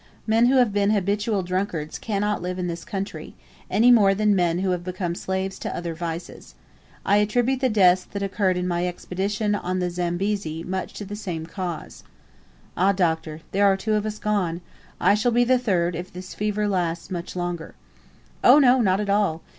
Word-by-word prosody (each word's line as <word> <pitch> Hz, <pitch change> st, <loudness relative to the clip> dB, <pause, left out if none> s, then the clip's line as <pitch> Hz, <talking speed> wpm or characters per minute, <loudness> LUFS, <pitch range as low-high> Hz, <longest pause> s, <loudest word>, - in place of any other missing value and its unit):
Men 225 Hz, +2 st, +4 dB
who 265 Hz, -, +3 dB
have 245 Hz, -5 st, +4 dB
been 200 Hz, 0 st, +2 dB
habitual 205 Hz, 0 st, 0 dB
drunkards 180 Hz, -4 st, -3 dB
cannot 210 Hz, -1 st, -1 dB
live 180 Hz, +1 st, -3 dB
in 180 Hz, -, -2 dB
this 170 Hz, -1 st, -4 dB
country, 195 Hz, 0 st, -6 dB, 0.3 s
any 240 Hz, +3 st, +5 dB
more 200 Hz, -5 st, +5 dB
than 210 Hz, 0 st, +2 dB
men 175 Hz, -2 st, +2 dB
who 185 Hz, 0 st, 0 dB
have 180 Hz, -1 st, -2 dB
become 180 Hz, -1 st, -3 dB
slaves 190 Hz, +2 st, -3 dB
to -, -, -4 dB
other 170 Hz, -1 st, -4 dB
vices. 165 Hz, -, -7 dB, 0.5 s
I 200 Hz, -, +4 dB
attribute 245 Hz, +5 st, +1 dB
the 260 Hz, -1 st, +2 dB
deaths 185 Hz, -4 st, +4 dB
that 200 Hz, -1 st, -5 dB
occurred 190 Hz, -1 st, 0 dB
in 180 Hz, 0 st, -1 dB
my 175 Hz, 0 st, 0 dB
expedition 200 Hz, +4 st, -2 dB
on 185 Hz, -2 st, -2 dB
the 180 Hz, -1 st, -1 dB
Zambezi 175 Hz, -1 st, -2 dB
to -, -, -10 dB
much 190 Hz, 0 st, -3 dB
the 205 Hz, 0 st, -6 dB
same 180 Hz, -7 st, -5 dB
cause." 175 Hz, -2 st, -6 dB, 0.7 s
"Ah, 195 Hz, +3 st, +3 dB
Doctor, 160 Hz, -4 st, -1 dB
there 200 Hz, +1 st, +3 dB
are 195 Hz, -1 st, +3 dB
two 215 Hz, +3 st, -1 dB
of 210 Hz, 0 st, 0 dB
us 215 Hz, 0 st, -4 dB
gone. 190 Hz, -6 st, -1 dB, 0.4 s
I -, -, +4 dB
shall 215 Hz, +4 st, +2 dB
be 240 Hz, +1 st, +4 dB
the 255 Hz, +1 st, +3 dB
third, 180 Hz, -7 st, 0 dB
if 175 Hz, +2 st, -6 dB
this 180 Hz, +1 st, -9 dB
fever 210 Hz, 0 st, -1 dB
lasts 175 Hz, -4 st, -2 dB
much 175 Hz, -1 st, -5 dB
longer." 175 Hz, -2 st, -4 dB, 0.7 s
"Oh -, -, +8 dB
no, 260 Hz, -3 st, +5 dB
not 190 Hz, -3 st, +2 dB
at 210 Hz, -1 st, -2 dB
all. 200 Hz, -6 st, +1 dB
190 Hz, 195 wpm, -24 LUFS, 175-210 Hz, 0.7 s, Oh